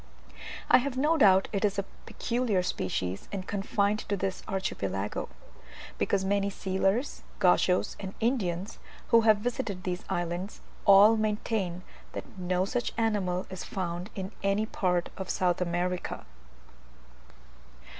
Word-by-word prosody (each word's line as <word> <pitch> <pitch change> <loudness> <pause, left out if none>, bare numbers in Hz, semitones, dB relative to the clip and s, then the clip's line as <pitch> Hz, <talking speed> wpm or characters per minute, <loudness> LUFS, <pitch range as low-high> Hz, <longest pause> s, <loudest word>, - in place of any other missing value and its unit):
I - - +7
have 255 0 -3
no 300 +5 +3
doubt 195 -9 +5
it 200 - 0
is 205 -1 +1
a 200 - -1 0.2
peculiar 230 -6 0
species, 95 - -2
and 195 -2 -4
confined 200 +1 0
to 200 - +1
this 190 0 -2
archipelago; 100 - -2 0.7
because 195 -1 +1
many 200 0 +1
sealers, 195 +6 -1 0.2
Gauchos, 180 0 +3
and 190 -1 -6
Indians, 205 -5 -1 0.3
who 230 - +6
have 220 -2 +5
visited 210 -4 -3
these 180 0 -3
islands, 175 +2 -3 0.3
all 205 +3 +8
maintain 210 -4 -1 0.3
that - - -4
no 180 0 0
such 240 +4 -2
animal 200 -5 0
is 185 -1 -5
found 180 0 -4
in 190 0 -4
any 200 +2 +1
part 180 -5 0
of 190 -1 -5
South 180 -1 +1
America. 175 - -2
195 Hz, 130 wpm, -29 LUFS, 180-210 Hz, 0.7 s, all